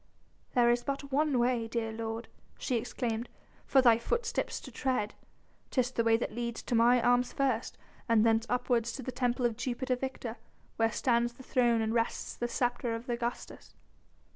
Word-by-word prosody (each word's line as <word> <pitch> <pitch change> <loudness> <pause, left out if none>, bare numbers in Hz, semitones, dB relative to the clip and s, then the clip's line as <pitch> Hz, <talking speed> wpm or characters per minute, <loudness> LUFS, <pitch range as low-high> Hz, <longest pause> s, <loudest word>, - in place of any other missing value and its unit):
"There 240 -1 +5
is 240 0 +1
but 275 0 -4
one 290 -1 +2
way, 240 -1 +1
dear 225 -1 -2
lord," 225 +1 -4 0.3
she 255 - -1
exclaimed, 235 0 -2 0.4
"for 265 -1 +5
thy 235 -2 +6
footsteps 465 - -1
to 260 - -10
tread! 245 -4 -1 0.6
Tis 255 -1 +1
the 230 - 0
way 225 0 +4
that 230 - -3
leads 235 0 -4
to - - -4
mine 235 +1 +5
arms 245 0 +3
first 260 -4 -1 0.3
and 225 -1 +5
thence 225 0 +3
upwards 245 -2 +1
to 270 - -6
the 255 - -4
temple 245 0 0
of 230 -2 0
Jupiter 255 +1 -1
Victor 250 -2 -5 0.4
where 225 0 +2
stands 240 0 +1
the 260 - -13
throne 240 -3 +2
and 220 0 -1
rests 230 0 -1
the 240 - -2
sceptre 240 -1 -1
of 230 +3 -7
Augustus." 240 0 -4
240 Hz, 175 wpm, -31 LUFS, 230-255 Hz, 0.6 s, thy